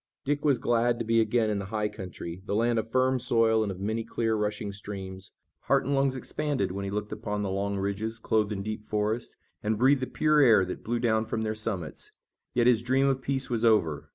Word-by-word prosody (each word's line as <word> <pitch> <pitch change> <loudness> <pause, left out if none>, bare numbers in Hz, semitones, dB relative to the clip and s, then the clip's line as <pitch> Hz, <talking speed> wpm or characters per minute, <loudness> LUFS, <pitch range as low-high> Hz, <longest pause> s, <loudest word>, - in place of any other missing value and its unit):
Dick 145 +1 0
was 145 -4 +3
glad 120 0 +1
to 115 - -3
be 115 0 +3
again 110 0 +1
in 100 - -1
the 100 - -4
high 105 +2 -1
country, 90 -3 -8
the 100 - -1
land 115 +1 +2
of 110 +1 -4
firm 130 +1 +2
soil 115 -2 +3
and 105 -2 -1
of 95 - -8
many 110 +3 -2
clear, 115 0 -1
rushing 105 -1 -2
streams. 95 -2 -7 0.4
Heart - - +2
and 140 - 0
lungs 135 -1 +2
expanded, 135 -6 -2
when 100 +1 -4
he - - -3
looked 105 +1 -3
upon 105 -1 -3
the 100 - -2
long 100 +1 -1
ridges, 100 +3 -2
clothed 110 -1 0
in 100 -2 -3
deep 110 0 -5
forest, 105 +2 -2 0.3
and 105 +1 0
breathed 130 +4 +4
the 130 - -1
pure 155 -1 +2
air 110 -8 +6
that 90 - -6
blew 120 +2 -1
down 115 -2 +1
from 110 0 -2
their 110 0 -1
summits. 105 -8 -4 0.5
Yet 120 -1 +3
his 120 -2 +4
dream 130 +3 +2
of 135 -1 +1
peace 135 -1 -2
was 115 -1 0
over. 105 -10 +2
110 Hz, 230 wpm, -28 LUFS, 100-120 Hz, 0.5 s, air